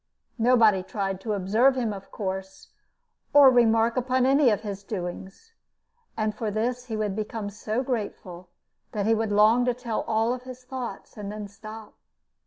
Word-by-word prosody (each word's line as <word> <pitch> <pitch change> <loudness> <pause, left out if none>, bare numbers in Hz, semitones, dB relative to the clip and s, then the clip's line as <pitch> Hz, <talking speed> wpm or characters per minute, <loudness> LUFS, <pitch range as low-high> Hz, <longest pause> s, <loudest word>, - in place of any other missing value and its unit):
Nobody 225 -5 +5
tried 195 0 -3
to 215 +1 -2
observe 215 +7 +3
him, 235 -5 -1
of 195 -1 -10
course, 190 -1 -6 0.7
or 280 -2 +9
remark 230 -1 +3
upon 255 0 +1
any 275 0 +5
of 210 -2 +1
his 200 -2 -5
doings, 195 - -7 0.6
and 215 -1 0
for 215 +1 -3
this 240 +4 -2
he 225 -3 -4
would 210 -2 -1
become 215 -1 -4
so 215 +4 -3
grateful 195 -7 -5 0.4
that 205 -2 -1
he 225 - +4
would 220 -1 0
long 215 +4 +5
to 250 -1 +1
tell 235 -3 -3
all 225 +3 +1
his 255 0 -11
thoughts, 250 -2 -7
and 205 -1 -5
then 210 -1 -6
stop. 215 +1 -11
220 Hz, 165 wpm, -26 LUFS, 205-245 Hz, 0.7 s, or